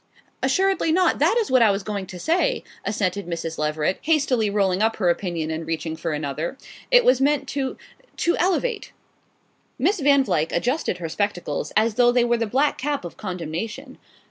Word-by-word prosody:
"Assuredly 385 -4 +2
not 365 +3 +2
that 465 - +3
is 450 - 0
what 255 -1 +5
I 225 - +6
was 200 0 0
going 200 -2 -4
to 185 -1 -8
say," 360 - 0 0.2
assented 200 -2 -2
Mrs. 165 -1 -4
Leveret, 150 +3 0
hastily 275 -9 +2
rolling 195 -2 +1
up 225 +1 +2
her 180 -4 +2
opinion 170 -3 -3
and 160 0 -4
reaching 160 0 -3
for 160 - -4
another. 150 - -3 0.3
"It - - +5
was 255 +1 +4
meant 285 +1 +2
to 270 -2 -3 0.4
to 340 - +1
elevate." 405 +5 -1 0.8
Miss 365 - +1
Van 280 -1 +4
Vluyck 160 -6 0
adjusted 245 - -1
her 170 -2 -5
spectacles 175 -6 -2
as 220 +1 +3
though 245 -1 +5
they 245 -1 +3
were 240 0 +2
the 230 -1 -1
black 275 +7 +1
cap 285 -5 -2
of 170 - -8
condemnation. 180 +1 -6
215 Hz, 180 wpm, -23 LUFS, 170-280 Hz, 0.8 s, I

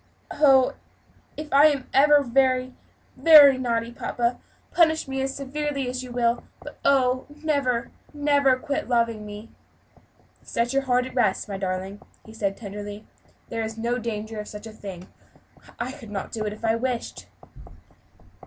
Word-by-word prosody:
"Oh! 270 -3 +4 0.6
if 305 -1 -7
I 285 +2 +8
am 280 -4 -1
ever 290 +1 +5
very, 255 0 +1 0.4
very 290 -5 +8
naughty, 235 -2 -1
papa, 240 0 -2 0.3
punish 320 -3 +3
me 265 0 -3
as 270 0 -2
severely 280 0 -3
as 250 0 -3
you 250 -1 -9
will; 240 -1 0 0.2
but - - -11
oh, 255 -2 +2 0.2
never, 275 -6 0 0.2
never 285 -3 +2
quit 275 0 -4
loving 230 -3 0
me." 210 +2 -10 0.9
"Set 235 +2 -2
your 275 - +2
heart 250 -2 +1
at 260 - -9
rest, 235 -7 +1
my 195 -2 -5
darling," 190 +1 -4 0.2
he 220 - -13
said, 200 -3 -2
tenderly, 205 0 -8 0.4
"there 230 -1 -3
is 220 0 -5
no 235 +2 -1
danger 220 -1 -5
of 210 - -6
such 210 +1 -9
a 220 - -8
thing. 190 -4 -9 0.7
I 245 +2 -3
could 255 -5 -12
not 200 -2 -5
do 220 -2 -4
it, 210 - -3
if 215 +2 -7
I 225 0 +2
wished." 245 0 -4
245 Hz, 160 wpm, -24 LUFS, 220-270 Hz, 0.9 s, I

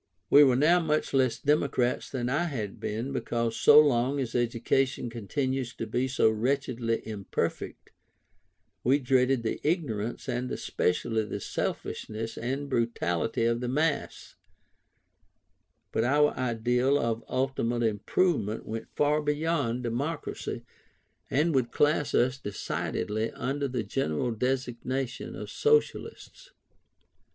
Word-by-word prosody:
We 145 - +9
were 130 -3 +5
now 160 +7 +5
much 155 -2 0
less 130 -4 +2
democrats 140 -4 +1
than 125 -3 -2
I 145 +7 +1
had 115 - -4
been, 115 +6 -3
because 115 -3 -1
so 150 0 +7
long 140 -1 +3
as 125 -4 -3
education 120 +1 0
continues 130 +2 -2
to - - -4
be 120 +4 -1
so 130 -3 +3
wretchedly 115 0 0
imperfect, 105 -3 -4 0.9
we 130 +4 +4
dreaded 130 -2 +2
the 110 - -2
ignorance 130 - -1
and 125 0 -2
especially 110 +5 0
the 105 - -5
selfishness 115 +1 -4
and 135 +4 -3
brutality 115 -4 0
of 115 0 +1
the 125 - -3
mass: 150 +4 -1 1.6
but 110 - +1
our 145 +4 +4
ideal 125 +2 +1
of 115 -4 -1
ultimate 130 -2 0
improvement 110 - 0
went 110 +1 -5
far 150 +1 +2
beyond 145 -5 0
Democracy, 125 0 -3 0.7
and 155 +4 +2
would 130 -3 +2
class 150 -1 +2
us 130 +2 +2
decidedly 105 0 -3
under 140 +3 -2
the 125 -3 -2
general 100 - -1
designation 125 +1 -2
of - - -7
Socialists. 450 +2 0
125 Hz, 120 wpm, -28 LUFS, 115-140 Hz, 1.6 s, We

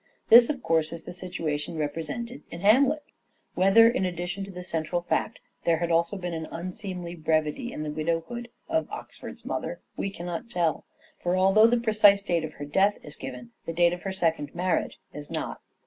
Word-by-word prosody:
This, 235 +1 +9
of 280 -4 -3
course, 160 -1 +2
is 165 0 -7
the - - -8
situation 170 -3 -3
represented 165 - -4
in 170 - -8
Hamlet. 270 +9 +4 0.5
Whether, 195 +5 +6
in 235 -3 +1
addition 180 +1 -3
to 195 - -8
the 180 -1 -7
central 170 0 -2
fact, 215 - -1 0.3
there 165 -1 +3
had 170 +1 -1
also 170 +4 +2
been 180 -2 -4
an 160 -1 -4
unseemly 180 0 -6
brevity 155 - 0
in 155 - -5
the 150 - -3
widowhood 165 +10 -2 0.2
of 320 -1 0
Oxford's - - -9
mother - - -3 0.2
we 195 - -2
cannot 175 +2 -6
tell; 175 -8 0 0.4
for 180 +1 +1
although 195 +4 +6
the 240 +1 +3
precise 215 -3 +5
date 170 -5 0
of 155 -1 -5
her 145 - -7
death 195 +8 +2
is 150 - -9
given, 125 -3 -8 0.2
the 165 - -2
date 175 +1 +4
of 175 - -6
her 195 - -3
second 165 -5 -1
marriage 180 +1 0
is 145 0 -8
not. - - -4
175 Hz, 190 wpm, -27 LUFS, 160-205 Hz, 0.5 s, This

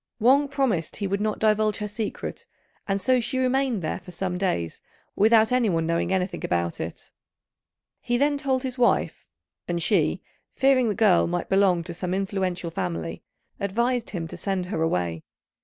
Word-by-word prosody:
Wang 270 +5 +5
promised 240 - -1
he 205 - -3
would 200 +1 -1
not 215 0 0
divulge 215 -1 +2
her 210 - -3
secret, 210 +1 -5 0.4
and 195 0 0
so 255 +6 +3
she 240 +3 -2
remained 255 -5 +1
there 155 - -2
for 180 - -14
some 180 0 -3
days 180 - -2 0.3
without 220 +2 +5
anyone 210 -10 +2
knowing 170 +2 0
anything 185 0 -1
about 85 -1 -1
it. 80 +1 -7 0.9
He 240 0 0
then 290 +3 +2
told 270 -2 0
his 255 -1 -4
wife, 240 - +1 0.4
and 175 -1 -1
she, 180 0 +1 0.3
fearing 260 -3 +3
the 210 - -1
girl 195 -4 +4
might 175 0 -2
belong 190 -3 +3
to 170 0 -6
some 180 +1 -3
influential 190 -3 -2
family, 85 - -4 0.4
advised 235 +4 0
him 170 -4 -4
to - - -7
send 190 -2 -2
her 180 -3 -3
away. 85 - 0
200 Hz, 170 wpm, -25 LUFS, 175-240 Hz, 0.9 s, Wang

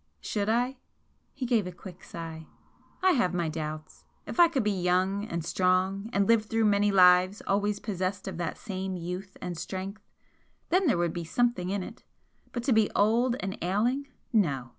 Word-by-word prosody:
"Should 205 -1 -2
I?" 245 +3 0 0.5
He 265 - -5
gave 230 -6 +1
a - - -5
quick 175 +1 -12
sigh. 160 -1 -8 0.6
"I 375 - +6
have 185 - +1
my 170 -2 0
doubts! 155 -1 -6 0.2
If - - -6
I 345 - +9
could 285 -7 -1
be 210 - +1
young 185 +2 +1
and 170 -6 -4
strong 185 +4 +1
and 200 0 +2
lie 230 - +6
through 220 +1 0
many 205 0 +3
lives 185 +4 +5
always 205 +1 0
possessed 190 -1 -3
of 190 -3 -5
that 175 - -3
same 190 -3 -4
youth 180 +3 -6
and 180 -1 -4
strength, 190 +4 -5 0.7
then 365 +1 +3
there 245 - +3
would 170 -1 0
be 175 - -4
something 210 0 0
in 195 -1 -1
it - - -10 0.5
but 240 -2 -4
to 255 0 +2
be 220 -1 +4
old 235 +4 +3
and 195 0 -3
ailing, 235 +10 0 0.3
no! 140 - +1
195 Hz, 185 wpm, -28 LUFS, 180-220 Hz, 0.7 s, I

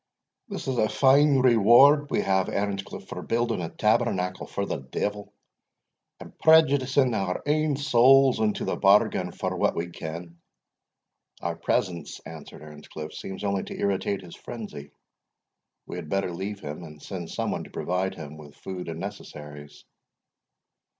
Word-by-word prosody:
"This 200 - -6
is 130 -3 -1
a 110 - +2
fine 140 +1 +4
reward 130 +5 +6
we - - +1
have, 95 -1 +1
Earnscliff, 100 -1 -3
for - - -6
building 115 -4 -1
a 85 - -4
tabernacle 105 -5 0
for 100 - -3
the - - -3
devil, 100 +10 -4 0.9
and - - -12
prejudicing 140 -5 +4
our 95 -4 -2
ain 150 0 +1
souls 135 -1 +5
into 110 -1 0
the - - -1
bargain, 100 +1 +3
for - - -3
what - - +1
we 85 +1 -3
ken." 85 +1 -8 1.0
"Our - - -3
presence," 85 -3 -2
answered 80 -2 -11
Earnscliff, 75 0 -9
"seems 95 - -7
only 100 -1 0
to - - -8
irritate 100 0 -1
his 85 - -11
frenzy; 105 -12 -8 1.0
we - - -7
had 80 -4 -7
better 95 0 -1
leave 100 +4 -5
him, 75 +2 -7
and 75 -2 -11
send 90 0 -7
some - - -2
one - - -3
to - - -13
provide 90 +2 -2
him 75 -1 -9
with 75 -2 -13
food 90 -2 -7
and 80 - -6
necessaries." 75 -1 -9
100 Hz, 150 wpm, -26 LUFS, 85-120 Hz, 1.0 s, reward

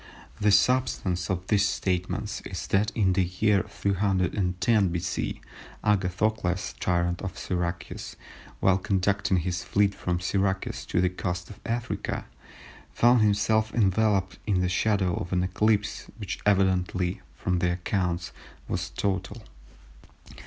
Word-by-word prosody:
The 105 0 +3
substance 105 -5 +2
of 90 -1 -2
these 100 0 +3
statements 95 +3 -2
is 90 -3 -5
that 105 +2 +3
in 95 -5 +3
the 95 - +3
year 95 +3 +2
310 95 +1 +1
B.C. 85 0 -2 0.4
Agathocles, 100 -1 0
Tyrant 85 0 0
of 100 - -5
Syracuse, 85 -1 -4 0.5
while 95 0 +4
conducting 95 0 +1
his 90 +1 -2
fleet 100 0 +2
from 90 -2 -2
Syracuse 95 +1 -1
to 90 - +1
the 90 - +3
Coast 90 0 -4
of 100 - -12
Africa, 120 +1 -3 0.7
found 120 0 +4
himself 110 +1 +2
enveloped 100 -2 +2
in 95 -4 +2
the 90 - +1
shadow 95 -1 +1
of 90 - -5
an 90 0 +2
eclipse, 105 +3 0
which 105 -5 -5
evidently, 95 -2 +2
from 90 -1 -1
the 90 0 +2
accounts, 90 -1 -1 0.4
was - - -2
total. 95 -3 -3
95 Hz, 125 wpm, -27 LUFS, 90-105 Hz, 0.7 s, while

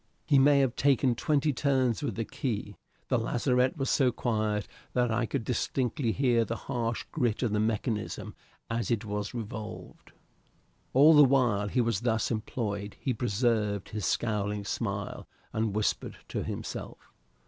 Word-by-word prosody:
He 145 -3 +5
may 140 +1 +6
have 130 -2 +1
taken 135 -2 +3
twenty 150 +4 +1
turns 130 - +1
with - - -2
the - - -2
key; - - -3 0.3
the - - +2
lazarette 125 +3 +1
was 135 -2 0
so 130 -3 +3
quiet 110 -4 -1 0.3
that 120 -2 +2
I 115 +1 +1
could 135 -1 -2
distinctly 125 +1 -1
hear 120 -2 +2
the 115 - -3
harsh 115 -1 -2
grit 120 -6 0
of 120 - +1
the 105 - +2
mechanism 110 0 -2 0.3
as 115 0 -2
it 115 -2 0
was 105 +1 -3
revolved. 110 -1 -7 0.8
All 150 +4 +8
the 150 -1 +8
while 125 -7 +3
he 125 +4 +1
was 115 -4 0
thus 110 -2 0
employed 105 -2 -3
he 130 - -1
preserved 110 -3 0
his 105 -4 -3
scowling 105 -2 -1
smile, - - -3 0.3
and 110 -2 -1
whispered 110 0 -1
to - - -2
himself. - - -5
115 Hz, 155 wpm, -29 LUFS, 105-130 Hz, 0.8 s, All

